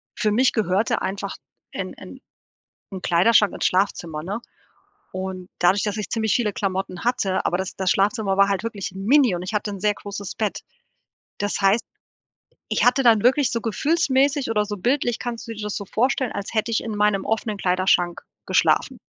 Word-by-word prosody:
für 210 - +1
mich 250 +4 +3
gehörte 205 0 +1
einfach 195 +1 -3 0.4
'n - - -4
'n - - -11 0.7
'n 190 -1 -6
Kleiderschrank 195 +4 +4
ins - - -3
Schlafzimmer, 170 -5 -1
ne? 205 +6 -4 0.7
Und 185 -1 -5
dadurch, 185 +3 +3
dass 210 0 -2
ich 210 - -3
ziemlich 220 -3 0
viele 215 -5 0
Klamotten 190 -1 -3
hatte 235 -6 0
aber 175 - +1
das 190 -1 -4
das 190 -1 +1
Schlafzimmer 200 -1 +1
war 200 0 +6
halt 195 +1 -1
wirklich 205 -5 -4
mini 230 +1 +3
und 175 - -4
ich 195 +4 -5
hatte 210 0 -1
'n 195 - -6
sehr 210 -1 +2
großes 200 -1 -7
Bett. 215 -3 -2 0.8
Das 205 0 -2
heißt, 195 +4 +3 0.8
ich - - +1
hatte 250 +2 +4
dann 225 -3 +5
wirklich 260 +3 +3
so 230 - -1
gefühlsmäßig 275 +2 +1
oder 210 -2 +2
so 205 0 -5
bildlich 245 +3 0
kannst 240 -2 -5
du - - -4
dir 215 - -7
das 210 -1 -3
so 200 - -4
vorstellen, 255 +3 0
als 200 +2 -5
hätte 220 +1 0
ich - - +1
in 220 -3 -4
meinem 205 -2 +2
offenen 220 -1 -1
Kleiderschrank 180 -2 +1 0.3
geschlafen. - - +2
210 Hz, 185 wpm, -23 LUFS, 190-230 Hz, 0.8 s, war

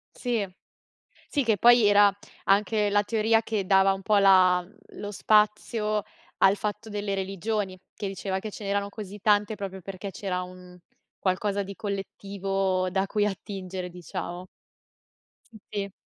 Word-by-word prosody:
Sì, 235 -5 -1 0.8
sì 285 -3 0
che 220 -3 +2
poi 240 +2 +6
era 205 0 +6 0.3
anche 210 +1 +2
la 205 0 +3
teoria 225 +1 +2
che 215 -4 -2
dava 195 0 +5
un 195 0 -5
po' 210 +2 +2
la 185 -2 +5 0.3
lo 205 - -6
spazio 210 +1 +2 0.4
al 195 +1 +5
fatto 210 +2 -4
delle 205 -1 -3
religioni, 195 0 -2 0.2
che 210 - -5
diceva 190 0 -3
che 215 +3 -6
ce 210 - -9
n'erano 200 0 -1
così 205 -1 -8
tante 210 +1 +3
proprio 190 -2 -6
perché 195 +2 -6
c'era 185 -1 -3
un 180 0 -11 0.4
qualcosa 200 +2 0
di 200 0 -7
collettivo 195 -2 -2
da 190 +2 0
cui 205 +1 +1
attingere, 190 -2 -5
diciamo. 175 0 -6 1.1
Sì, 220 - -13
sì. 200 -1 -3
200 Hz, 145 wpm, -27 LUFS, 190-210 Hz, 1.1 s, poi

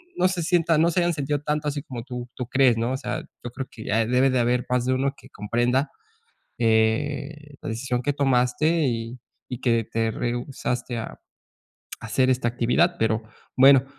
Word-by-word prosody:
no 185 - +3
se 185 -3 -2
sienta 170 -2 +2
no 165 +2 +3
se 180 - +1
hayan 175 0 +2
sentido 145 -1 -2
tanto, 150 0 -2
así 145 -1 -2
como 120 -4 -7
tú, 125 -1 -7
tú 125 - -4
crees, 130 -1 +3
¿no? 115 +2 0
O 130 - -1
sea, - - -4 0.2
yo 120 - -4
creo 130 +2 -5
que 110 - -10
ya 110 +1 +1
debe 125 +3 +3
de 130 - +1
haber 125 +1 +2
más 125 -1 +1
de 130 - +2
uno 135 +1 +1
que - - -16
comprenda, 120 +6 0 0.7
eh, 140 +6 0
la - - -7
decisión 120 +2 -2
que 145 +3 0
tomaste 140 +4 +2
y, 115 +1 -3 0.3
y 125 - -5
que 115 -3 +2
te 115 +1 -1
rehusaste 120 +1 -3
a 115 - -6 1.0
esta 130 -2 +3
actividad. 125 +9 +2
Pero 110 0 +1 0.4
bueno, 135 0 +7
130 Hz, 185 wpm, -24 LUFS, 120-145 Hz, 1.0 s, bueno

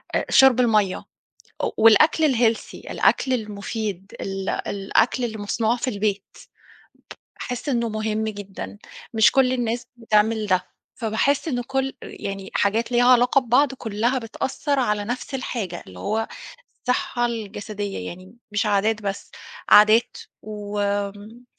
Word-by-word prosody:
آآ، - - +1
شُرب 265 -2 +6
المَيّه 215 -6 +3 0.7
و - - 0
والأكل 280 +7 +5
الhealthy، 230 -2 +1 0.2
الأكل 260 - +2
المفيد، 210 -3 -4
ال 195 0 -4
الأكل 210 +5 0
اللي 220 -2 -4
مصنوع 220 +3 0
في 245 - -3
البيت. 205 -2 -3 1.0
باحِس 250 +3 -4
إنه 235 -3 0
مهم 215 0 -2
جدًا، 205 -1 -7 0.4
مش 220 -1 +5
كل 260 -1 +3
الناس 240 0 -2
بتعمل 220 -1 +1
ده. 185 -2 +1 0.3
فباحِس 245 +7 0
إنه 245 -4 -1
كل 270 0 -1
يعني، 195 -1 -7
حاجات 225 +4 +1
ليها 245 0 +3
علاقة 250 +2 +5
ببعض، 260 +3 +3
كلها 235 +1 -1
بتأثِّر 270 +5 -2
على 210 -4 0
نفس 250 +4 -4
الحاجة، 215 -9 -4
اللي 90 -1 -12
هو 220 - -1 0.6
الصحة 245 -1 0
الجسدية 205 - -5
يعني، 185 +4 -10 0.2
مش 205 +2 0
عادات 210 +1 +1
بس، 195 -1 -4 0.4
عادات 215 +3 +6 0.2
وآمم، 205 +2 -4
220 Hz, 130 wpm, -23 LUFS, 205-245 Hz, 1.0 s, شُرب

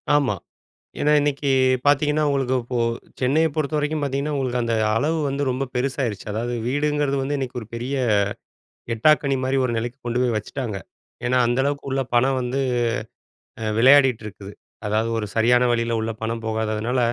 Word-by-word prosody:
ஆமா. 140 -8 +2 0.6
ஏன்னா 150 - +2
இன்னைக்கு 145 -1 0 0.4
பார்த்தீங்கன்னா, 150 +1 +3
உங்களுக்கு 135 -2 0
இப்போ 120 +1 -4 0.4
சென்னைய 145 +6 +3
பொறுத்த 155 -1 -1
வரைக்கும் 150 +1 -1
பார்த்தீங்கன்னா, 140 +2 -1
உங்களுக்கு 130 -3 -1
அந்த 115 -1 0 0.2
அளவு 150 +7 +1
வந்து 140 +1 -1
ரொம்ப 130 +2 -1
பெருசாயிருச்சு. 125 -5 -2
அதாவது 115 +3 -2
வீடுங்கிறது 145 +1 0
வந்து 140 +2 -1
இன்னைக்கு 130 -2 -4
ஒரு 110 - -10
பெரிய 125 +4 -3 1.0
எட்டாக்கனி 140 +3 +3
மாதிரி 130 +1 +1
ஒரு 125 - -1
நிலைக்கு 120 +2 -4
கொண்டு 120 +1 0
போய் 120 -3 +1
வச்சுட்டாங்க. 110 0 -4 0.5
ஏன்னா, 125 +1 +2
அந்த 120 +2 0
அளவுக்கு 140 0 -2
உள்ள 135 0 +1
பணம் 130 +2 +3
வந்து 125 +2 -2 1.0
அ 110 - -2
விளையாடிட்டு 130 -2 +6
இருக்குது. 100 -1 -9 0.4
அதாவது 110 +2 0
ஒரு 110 - -2
சரியான 120 +2 +4
வழில 115 -1 0
உள்ள 110 +1 -2
பணம் 115 0 -3
போகாததுனால, 110 +2 -1
130 Hz, 160 wpm, -23 LUFS, 115-140 Hz, 1.0 s, விளையாடிட்டு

